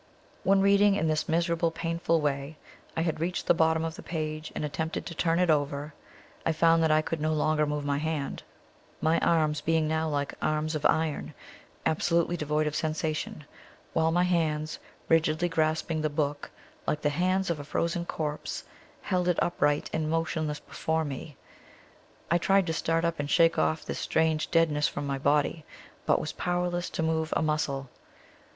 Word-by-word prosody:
When, 195 Hz, 0 st, +4 dB
reading 200 Hz, +1 st, +5 dB
in 165 Hz, -, 0 dB
this 155 Hz, 0 st, 0 dB
miserable, 170 Hz, 0 st, +1 dB
painful 165 Hz, 0 st, 0 dB
way, 140 Hz, +1 st, -2 dB, 0.4 s
I -, -, +2 dB
had 160 Hz, -2 st, -1 dB
reached 175 Hz, +3 st, -2 dB
the -, -, +5 dB
bottom 160 Hz, -1 st, +2 dB
of 165 Hz, -, -3 dB
the -, -, -9 dB
page, 155 Hz, -1 st, -4 dB
and -, -, -2 dB
attempted 160 Hz, +2 st, -3 dB
to 170 Hz, -, -6 dB
turn 165 Hz, 0 st, +1 dB
it 180 Hz, -2 st, +3 dB
over, 145 Hz, 0 st, -1 dB, 0.5 s
I 165 Hz, -, +1 dB
found 165 Hz, +1 st, +4 dB
that 160 Hz, -, +3 dB
I 155 Hz, 0 st, +4 dB
could 160 Hz, 0 st, -3 dB
no 155 Hz, +1 st, +1 dB
longer 155 Hz, 0 st, +2 dB
move 150 Hz, -1 st, -2 dB
my 140 Hz, 0 st, 0 dB
hand 155 Hz, -2 st, -3 dB, 0.6 s
my 160 Hz, +1 st, +2 dB
arms 155 Hz, -3 st, +2 dB
being 160 Hz, 0 st, +1 dB
now 160 Hz, 0 st, 0 dB
like 145 Hz, -1 st, -1 dB
arms 155 Hz, +1 st, 0 dB
of 155 Hz, -1 st, +2 dB
iron, 160 Hz, -2 st, -1 dB, 0.5 s
absolutely 170 Hz, +2 st, +2 dB
devoid 150 Hz, -1 st, 0 dB
of 150 Hz, 0 st, -2 dB
sensation, 155 Hz, -1 st, -2 dB, 0.5 s
while 160 Hz, 0 st, +3 dB
my 175 Hz, +2 st, +3 dB
hands, 155 Hz, -3 st, 0 dB, 0.3 s
rigidly 165 Hz, +1 st, +3 dB
grasping 160 Hz, -1 st, 0 dB
the 155 Hz, -, +1 dB
book 145 Hz, -1 st, -2 dB, 0.4 s
like 150 Hz, -, -1 dB
the 150 Hz, -, +3 dB
hands 185 Hz, +4 st, +1 dB
of 160 Hz, -, -2 dB
a -, -, -5 dB
frozen 170 Hz, +3 st, -1 dB
corpse, 150 Hz, -3 st, -4 dB, 0.4 s
held 180 Hz, -2 st, 0 dB
it 180 Hz, -, +2 dB
upright 145 Hz, -4 st, +1 dB
and 155 Hz, -1 st, -1 dB
motionless 160 Hz, -2 st, -1 dB
before 160 Hz, 0 st, -2 dB
me. 145 Hz, +1 st, -7 dB, 0.9 s
I 170 Hz, -, +4 dB
tried 195 Hz, +2 st, +3 dB
to 165 Hz, -, -1 dB
start 165 Hz, +1 st, 0 dB
up 170 Hz, -1 st, -1 dB
and 145 Hz, 0 st, -2 dB
shake 165 Hz, +2 st, +4 dB
off 160 Hz, -, +1 dB
this -, -, -4 dB
strange 160 Hz, -1 st, +1 dB
deadness 155 Hz, -3 st, +3 dB
from -, -, -4 dB
my 140 Hz, -1 st, -2 dB
body, 145 Hz, +3 st, +1 dB, 0.4 s
but -, -, +4 dB
was -, -, -4 dB
powerless 175 Hz, 0 st, -1 dB
to 165 Hz, -, -2 dB
move 160 Hz, 0 st, 0 dB
a -, -, 0 dB
muscle. 140 Hz, -4 st, -1 dB
160 Hz, 180 wpm, -28 LUFS, 150-165 Hz, 0.9 s, reading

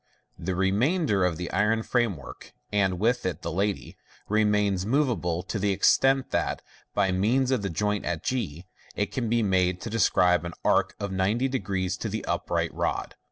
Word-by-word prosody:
The 90 Hz, +1 st, -2 dB
remainder 105 Hz, -, +2 dB
of 90 Hz, -3 st, +1 dB
the 90 Hz, 0 st, -5 dB
iron 105 Hz, +3 st, +1 dB
framework 110 Hz, -, -2 dB, 0.2 s
(and 95 Hz, -3 st, +1 dB
with 115 Hz, +5 st, +1 dB
it 90 Hz, -4 st, -3 dB
the 85 Hz, -, -3 dB
lady) 100 Hz, +4 st, -2 dB, 0.3 s
remains 105 Hz, -3 st, +2 dB
moveable, 110 Hz, -, 0 dB
to 105 Hz, +2 st, -4 dB
the 100 Hz, +1 st, +1 dB
extent 135 Hz, +6 st, +3 dB
that, -, -, -1 dB, 0.3 s
by 95 Hz, -, +2 dB
means 120 Hz, +8 st, +2 dB
of 130 Hz, -5 st, +1 dB
the 100 Hz, -, -2 dB
joint 105 Hz, +5 st, -1 dB
at 85 Hz, -3 st, -3 dB
g, 90 Hz, -, -3 dB, 0.3 s
it 100 Hz, -, -1 dB
can 120 Hz, -4 st, -2 dB
be 115 Hz, 0 st, +2 dB
made 90 Hz, -2 st, +2 dB
to 115 Hz, -, -5 dB
describe 90 Hz, -6 st, +3 dB
an 85 Hz, 0 st, -6 dB
arc -, -, +2 dB
of 100 Hz, -1 st, -3 dB
900 105 Hz, +8 st, 0 dB, 0.5 s
to 110 Hz, -, -3 dB
the 110 Hz, +1 st, -4 dB
upright -, -, -1 dB
rod. -, -, -2 dB
100 Hz, 170 wpm, -26 LUFS, 90-115 Hz, 0.5 s, extent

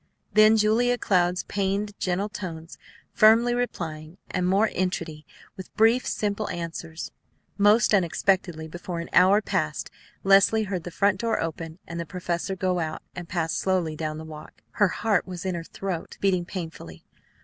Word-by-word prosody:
Then 215 Hz, +1 st, +6 dB
Julia 230 Hz, +3 st, +3 dB
Cloud's 180 Hz, -4 st, +1 dB
pained, 200 Hz, +1 st, -2 dB
gentle 185 Hz, +2 st, 0 dB
tones, 170 Hz, -6 st, -8 dB, 0.3 s
firmly 230 Hz, +2 st, +5 dB
replying, 165 Hz, -9 st, -4 dB
and 180 Hz, -2 st, 0 dB
more 200 Hz, +4 st, +3 dB
entreaty, 165 Hz, -4 st, -3 dB, 0.3 s
with 190 Hz, -, -10 dB
brief, 225 Hz, +3 st, +4 dB
simple 210 Hz, 0 st, -2 dB
answers. 165 Hz, -1 st, -6 dB, 0.4 s
Most 210 Hz, +2 st, +4 dB
unexpectedly, 175 Hz, -3 st, +1 dB
before 175 Hz, +1 st, -6 dB
an 170 Hz, -, -6 dB
hour 195 Hz, +3 st, +5 dB
passed -, -, -2 dB, 0.3 s
Leslie 195 Hz, +3 st, +5 dB
heard 190 Hz, -5 st, -4 dB
the -, -, -4 dB
front 195 Hz, +2 st, +1 dB
door 230 Hz, -1 st, 0 dB
open 165 Hz, 0 st, -4 dB
and 170 Hz, 0 st, -6 dB
the 170 Hz, -, -4 dB
professor 180 Hz, +3 st, -3 dB
go 185 Hz, -1 st, 0 dB
out 160 Hz, -1 st, -4 dB
and 175 Hz, -1 st, -7 dB
pass 165 Hz, -3 st, -1 dB
slowly 180 Hz, -5 st, 0 dB
down 155 Hz, 0 st, -4 dB
the 160 Hz, -, -8 dB
walk. 155 Hz, -1 st, -12 dB
Her 205 Hz, -, +3 dB
heart 200 Hz, 0 st, 0 dB
was 180 Hz, -1 st, -7 dB
in 185 Hz, -, -1 dB
her 170 Hz, -1 st, -4 dB
throat, 180 Hz, 0 st, -5 dB
beating 185 Hz, -3 st, +1 dB
painfully. 160 Hz, -, -8 dB
185 Hz, 160 wpm, -25 LUFS, 165-205 Hz, 0.4 s, Then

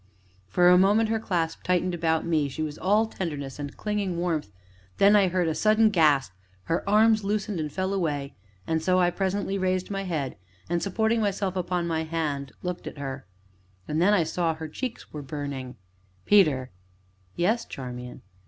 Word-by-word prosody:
For 175 Hz, -, +3 dB
a 180 Hz, 0 st, +7 dB
moment 210 Hz, +4 st, +4 dB
her 225 Hz, 0 st, +1 dB
clasp 170 Hz, -6 st, -2 dB
tightened 180 Hz, 0 st, 0 dB
about 160 Hz, -1 st, 0 dB
me, 155 Hz, -4 st, +1 dB
she 155 Hz, +4 st, -4 dB
was 150 Hz, -1 st, -5 dB
all 210 Hz, +4 st, +3 dB
tenderness 150 Hz, -10 st, -5 dB
and 145 Hz, -1 st, -6 dB
clinging 205 Hz, -4 st, -2 dB
warmth; 165 Hz, -, -1 dB, 0.5 s
then 200 Hz, +1 st, +6 dB
I 200 Hz, -2 st, +5 dB
heard 180 Hz, -1 st, 0 dB
a 160 Hz, -, +1 dB
sudden 215 Hz, +4 st, +4 dB
gasp, 150 Hz, -, +3 dB, 0.3 s
her 165 Hz, -, -1 dB
arms 215 Hz, +1 st, +4 dB
loosened 205 Hz, -2 st, -1 dB
and 150 Hz, -1 st, -3 dB
fell 190 Hz, +4 st, -2 dB
away, 145 Hz, -7 st, -2 dB, 0.3 s
and 160 Hz, 0 st, 0 dB
so 185 Hz, +2 st, +2 dB
I 175 Hz, -1 st, +3 dB
presently 195 Hz, +1 st, -1 dB
raised 185 Hz, +1 st, -1 dB
my 195 Hz, -1 st, -2 dB
head, 155 Hz, -7 st, -3 dB, 0.3 s
and, 170 Hz, 0 st, 0 dB
supporting 220 Hz, +5 st, +1 dB
myself 200 Hz, -2 st, -1 dB
upon 180 Hz, -1 st, -1 dB
my 165 Hz, -1 st, -1 dB
hand, 150 Hz, -4 st, -3 dB
looked 180 Hz, -1 st, -4 dB
at -, -, -7 dB
her. 135 Hz, -1 st, -6 dB, 0.6 s
And 155 Hz, +2 st, 0 dB
then 190 Hz, +4 st, +5 dB
I 175 Hz, -, +3 dB
saw 165 Hz, +1 st, 0 dB
that -, -, -13 dB
her 160 Hz, 0 st, -5 dB
cheeks 240 Hz, +10 st, -6 dB
were 150 Hz, -, -5 dB
burning. 140 Hz, -3 st, -5 dB, 0.5 s
"Peter." 150 Hz, -11 st, +4 dB, 0.6 s
"Yes, 220 Hz, +7 st, +1 dB
Charmian?" 125 Hz, -3 st, -8 dB
175 Hz, 180 wpm, -26 LUFS, 150-195 Hz, 0.6 s, a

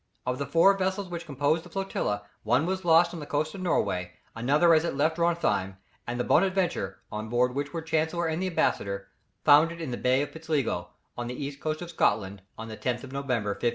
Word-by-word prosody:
Of 125 Hz, +1 st, -2 dB
the 140 Hz, -, -2 dB
four 195 Hz, +4 st, +5 dB
vessels 190 Hz, 0 st, -1 dB
which 170 Hz, -1 st, -6 dB
composed 145 Hz, +3 st, +1 dB
the -, -, -13 dB
flotilla, 150 Hz, -, -2 dB, 0.2 s
one 125 Hz, +7 st, +2 dB
was 190 Hz, +1 st, -2 dB
lost 170 Hz, +1 st, +5 dB
on 170 Hz, -, -5 dB
the 145 Hz, -, -7 dB
coast 155 Hz, +2 st, -1 dB
of 195 Hz, -, -7 dB
Norway, 90 Hz, -, 0 dB, 0.2 s
another 145 Hz, +9 st, +4 dB
as 155 Hz, 0 st, +4 dB
it 170 Hz, -, -2 dB
left 155 Hz, +3 st, +1 dB
Drontheim, 170 Hz, -, +1 dB, 0.3 s
and 120 Hz, +1 st, -3 dB
the -, -, +1 dB
Bonaventure, 180 Hz, -, +1 dB
on 110 Hz, +1 st, -5 dB
board 125 Hz, +2 st, +2 dB
of -, -, -11 dB
which 145 Hz, +1 st, -2 dB
were 165 Hz, +1 st, -4 dB
Chancellor 160 Hz, +1 st, 0 dB
and 160 Hz, +2 st, -1 dB
the 190 Hz, -, 0 dB
ambassador, 100 Hz, -, -1 dB, 0.3 s
foundered 160 Hz, +3 st, +5 dB
in 160 Hz, -6 st, -4 dB
the 120 Hz, -, -3 dB
Bay 130 Hz, +2 st, +2 dB
of 145 Hz, -, -6 dB
Pitsligo, 160 Hz, -3 st, -2 dB, 0.3 s
on 120 Hz, 0 st, -4 dB
the 125 Hz, -, -4 dB
east 140 Hz, +1 st, -5 dB
coast 155 Hz, +2 st, -3 dB
of 170 Hz, -, -8 dB
Scotland 100 Hz, -, 0 dB, 0.2 s
on 110 Hz, -, -7 dB
the 110 Hz, -1 st, -7 dB
10th 125 Hz, -1 st, -2 dB
of 130 Hz, -, -9 dB
November, 130 Hz, -6 st, -1 dB
1556. 120 Hz, +4 st, 0 dB
145 Hz, 225 wpm, -27 LUFS, 120-170 Hz, 0.3 s, four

